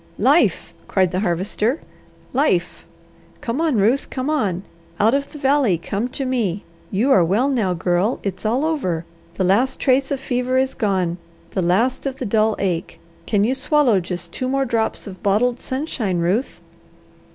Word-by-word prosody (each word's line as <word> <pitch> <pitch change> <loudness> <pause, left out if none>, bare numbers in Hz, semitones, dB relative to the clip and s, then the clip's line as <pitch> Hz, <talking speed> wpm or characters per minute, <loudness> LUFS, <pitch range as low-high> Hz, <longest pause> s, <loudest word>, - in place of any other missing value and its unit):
"Life!" - - +2
cried 185 -3 +2
the 185 - -1
Harvester. 205 - 0 0.5
"Life! 215 - 0 0.5
Come 245 +6 -2
on, 320 -5 +2
Ruth, 230 +8 +2
come 260 +3 -2
on! 195 - 0 0.4
Out 220 +3 +4
of 280 0 -1
the - - -9
valley 270 - +2
come 200 +7 -3
to 270 +1 -4
me! 215 -7 -1 0.3
You 230 +8 +1
are 185 - +6
well 210 +11 +2
now, 215 -9 +1
Girl! 175 +6 0
It's 190 -2 -4
all 240 +7 +1
over! 185 - -1 0.3
The 190 - 0
last 210 +8 +2
trace 265 +1 +2
of 280 - -1
fever 255 0 -1
is 265 0 +1
gone, 185 -6 0 0.3
the 190 - -1
last 220 +11 +1
of 270 - -3
the 260 - -5
dull 215 0 +2
ache. 180 -4 -2 0.3
Can 205 -2 +2
you 240 +5 +2
swallow 270 -5 +3
just 175 -1 -6
two 255 +6 -3
more 270 0 +1
drops 230 -2 -1
of 190 -3 -9
bottled 235 +5 +2
sunshine, 260 - -2
Ruth?" 185 +10 -1
225 Hz, 170 wpm, -21 LUFS, 185-265 Hz, 0.5 s, are